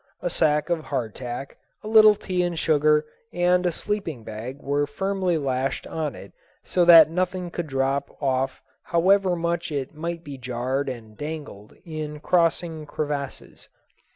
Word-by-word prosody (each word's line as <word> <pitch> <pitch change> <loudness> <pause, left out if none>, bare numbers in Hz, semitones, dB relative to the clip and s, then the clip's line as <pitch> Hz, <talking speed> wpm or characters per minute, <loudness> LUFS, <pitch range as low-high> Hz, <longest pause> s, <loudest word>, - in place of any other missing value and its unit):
A 175 - 0
sack 150 +1 +2
of 160 -2 -1
hardtack, 125 +1 -4 0.3
a - - -7
little 215 -1 +7
tea 185 -3 -2
and 175 -1 -1
sugar, 150 -1 +3 0.3
and 180 -1 +2
a - - +1
sleeping 165 - -3
bag 110 +5 -7
were 145 +1 0
firmly 190 +2 -1
lashed 135 -2 -1
on 155 -2 -3
it - - -12 0.3
so 180 - +1
that 165 -2 +9
nothing 180 0 -2
could 170 -2 -4
drop 135 0 0
off 135 -1 -1 0.2
however 185 +2 +3
much 170 -1 -2
it 140 -1 -3
might 170 +2 -5
be 140 -3 -8
jarred 130 +2 -2
and 110 -4 -8
dangled 145 -9 -7
in 155 -2 -5
crossing 165 -2 +1
crevasses. 145 -2 -5
155 Hz, 150 wpm, -24 LUFS, 135-175 Hz, 0.3 s, that